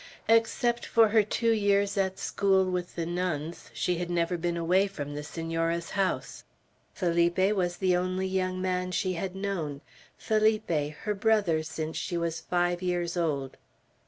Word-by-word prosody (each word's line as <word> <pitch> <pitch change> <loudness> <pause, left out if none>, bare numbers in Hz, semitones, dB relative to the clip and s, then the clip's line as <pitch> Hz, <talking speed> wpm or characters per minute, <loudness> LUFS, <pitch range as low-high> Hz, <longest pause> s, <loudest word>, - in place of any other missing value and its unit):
Except 230 +1 +2
for 225 -2 +4
her 220 +1 +5
two 230 +3 0
years 200 -2 +2
at 190 -1 0
school 195 -1 +2
with 180 -1 -3
the 170 - -2
nuns, 170 -2 -3
she 180 -1 -1
had 175 0 -3
never 175 0 0
been 170 0 -2
away 180 +4 +3
from 145 -7 -6
the 145 - -4
Senora's 165 +2 -2
house. 195 -2 -1 0.5
Felipe 175 +2 +2
was 175 -2 0
the 185 -2 +2
only 185 +1 -1
young 185 -1 -1
man 180 -1 -1
she 185 0 0
had 185 +2 -4
known, 175 -8 -3 0.4
Felipe, 215 -1 +1 0.3
her 210 - 0
brother 205 -6 +2
since 160 0 -5
she 175 - -2
was 165 -1 -2
five 175 +1 0
years 175 -1 -1
old. 145 -6 -1
180 Hz, 160 wpm, -28 LUFS, 170-195 Hz, 0.5 s, her